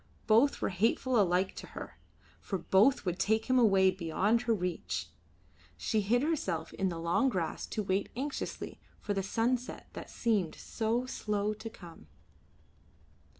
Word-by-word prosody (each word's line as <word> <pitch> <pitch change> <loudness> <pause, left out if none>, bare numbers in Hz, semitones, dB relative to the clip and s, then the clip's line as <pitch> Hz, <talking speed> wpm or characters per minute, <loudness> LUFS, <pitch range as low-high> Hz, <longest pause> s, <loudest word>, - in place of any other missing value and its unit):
Both 235 +6 +4
were - - +2
hateful 225 +5 +2
alike 185 0 +2
to - - -7
her, - - -8 0.4
for 195 - -3
both 200 +8 +3
would 180 0 -1
take 220 +1 +2
him 255 -1 +3
away 195 -5 +5
beyond 190 +6 +1
her 240 -2 +1
reach. 180 -3 -3 0.7
She 220 - 0
hid 240 +6 +2
herself 190 - -1
in 190 -1 0
the 170 - -4
long 170 +11 +2
grass 175 -8 -2
to 215 - -2
wait 195 +1 0
anxiously 275 +3 -4 0.2
for 205 - -2
the 195 - 0
sunset 240 +5 -1
that - - -8
seemed 210 -8 0
so 230 +2 -1
slow 210 -4 -1
to 220 +2 -7
come. 175 -7 -13
210 Hz, 150 wpm, -31 LUFS, 185-235 Hz, 0.7 s, away